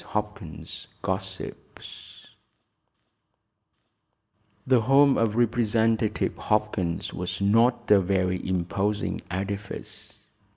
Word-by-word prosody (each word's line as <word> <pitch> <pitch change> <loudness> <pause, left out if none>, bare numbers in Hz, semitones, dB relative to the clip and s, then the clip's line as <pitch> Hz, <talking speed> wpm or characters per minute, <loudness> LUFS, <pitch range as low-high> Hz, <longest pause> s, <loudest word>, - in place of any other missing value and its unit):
HOPKINS 105 -7 -6 0.2
GOSSIPS - - -7 2.4
The 130 -3 +4
home 135 +3 +5
of 110 -2 +1
Representative 115 -2 +1
Hopkins 105 -5 -1
was 90 0 -4
not 115 +4 +3
a 105 - +8
very 90 -1 0
imposing 95 +3 -1
edifice. 100 +2 -6
105 Hz, 75 wpm, -26 LUFS, 95-115 Hz, 2.4 s, a